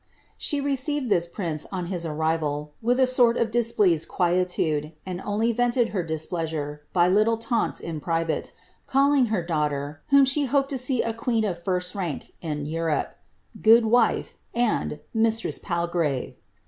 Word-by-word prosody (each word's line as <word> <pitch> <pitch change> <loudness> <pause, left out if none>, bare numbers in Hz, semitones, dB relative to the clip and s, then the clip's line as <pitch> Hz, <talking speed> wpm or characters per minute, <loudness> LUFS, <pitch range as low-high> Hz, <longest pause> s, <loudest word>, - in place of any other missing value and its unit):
She 290 - 0
received 280 -1 -1
this 170 -2 +3
prince, 170 -4 -4
on 185 -2 -3
his 170 -2 -3
arrival, 150 -1 -1
with 245 +3 +1
a 260 - +6
sort 245 -2 +3
of 225 -1 0
dis 235 0 +2
pleased 180 -8 +2
quietude, 175 -4 0
and 185 -1 -5
only 215 +4 0
vented 240 0 +1
her 195 - -1
displeasure 160 -2 -3
by 175 -1 +3
little 215 +4 +3
taunts 230 0 -1
in 165 -2 -5
private, 165 0 -1 0.4
calling 275 -1 +3
her 210 -5 -1
daughter, 150 -3 -2
whom 280 0 +6
she 270 +3 +2
had 275 - -1
hoped 275 0 +2
to 270 - -1
see 255 -1 +1
• 230 -1 -2
queen 230 -2 0
ot 175 -4 -4
first 180 -1 0
rank 175 -8 -5
in 150 -3 -3
Europe, 160 0 -1 0.5
^ - - -16
Good 225 +1 +6
wife,'' 230 0 +2 0.2
and 240 -2 +1
^ - - -7
Mistress 225 0 +1
Palgrave." 170 -6 -2
185 Hz, 170 wpm, -25 LUFS, 165-235 Hz, 0.5 s, a